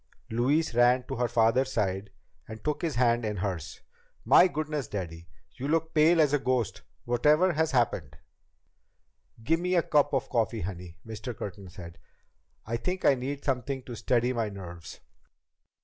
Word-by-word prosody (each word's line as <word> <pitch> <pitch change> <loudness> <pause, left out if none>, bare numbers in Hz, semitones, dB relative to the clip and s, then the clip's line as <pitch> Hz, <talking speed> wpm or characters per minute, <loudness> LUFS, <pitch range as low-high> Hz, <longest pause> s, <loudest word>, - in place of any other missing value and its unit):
Louise 130 +7 +1
ran 120 +2 +4
to - - -6
her 120 0 +1
father's 120 +3 +2
side 100 -3 -1 0.4
and 110 0 -9
took 150 -1 -2
his 165 -4 -2
hand 120 -1 +2
in 105 -2 -2
hers. 90 -5 -4 0.4
"My 180 - +7
goodness, 150 -5 -3
Daddy! 85 -4 -6 0.3
You 135 - -5
look 160 +1 +2
as 160 - -27
pale 160 +2 +5
as 150 -2 +4
a 145 - +3
ghost. 130 -4 -1 0.2
Whatever 150 +9 +3
has 160 0 +1
happened?" 105 - 0 1.3
"Get 165 +8 +2
me 180 +1 0
a 170 - +3
cup 145 -2 +2
of 130 - -1
coffee, 115 -2 -1
honey," 90 -2 -7
Mr. 110 +2 -7
Curtin 100 -1 -7
said. 85 -2 -11 0.7
"I 115 +2 -2
think 185 +9 -3
I - - +7
need 135 +2 -5
something 135 0 -2
to 120 - -8
steady 125 +1 +1
my 115 -3 -1
nerves." 90 -4 -10
120 Hz, 165 wpm, -28 LUFS, 105-145 Hz, 1.3 s, My